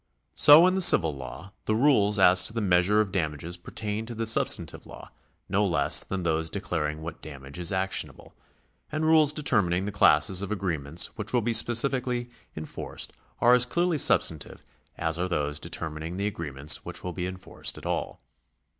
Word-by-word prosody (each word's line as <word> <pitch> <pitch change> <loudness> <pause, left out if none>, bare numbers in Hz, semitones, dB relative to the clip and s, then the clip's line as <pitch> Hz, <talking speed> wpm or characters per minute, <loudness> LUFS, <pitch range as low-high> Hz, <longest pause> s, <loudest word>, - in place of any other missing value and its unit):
So 150 +4 +7
in 185 - +3
the 190 - 0
civil 85 - +5
law, 85 +9 -10
the 110 - 0
rules 110 -5 +3
as 90 -1 +5
to - - 0
the 115 - -2
measure 100 +1 +2
of 100 -2 -3
damages 80 -2 -3
pertain 105 +4 -6
to 120 - -7
the 115 +1 -3
substantive 110 - 0
law, - - -12 0.4
no 100 +2 0
less 90 -4 +2
than 95 -1 -5
those 80 -1 -1
declaring 80 -5 -4
what 80 -1 -8
damage 70 0 -10
is 90 +3 0
actionable; 95 0 -3 0.6
and 155 +1 -2
rules 155 -2 +4
determining 100 - 0
the 105 - -4
classes 95 -1 +3
of 100 - -5
agreements 85 -6 -2
which 105 +1 -5
will 120 -3 +1
be 115 +1 -1
specifically 120 +1 +1 0.3
enforced 80 0 -6 0.3
are 120 +1 +5
as 125 0 +3
clearly 170 +3 0
substantive 80 - +1 0.3
as 80 +1 -2
are 90 - -1
those 75 -4 -2
determining 80 +3 -6
the 100 - -2
agreements 75 -7 -1
which - - -6
will 90 - -5
be 90 0 -4
enforced 95 0 -3
at - - -12
all. - - -4
95 Hz, 175 wpm, -26 LUFS, 80-115 Hz, 0.6 s, So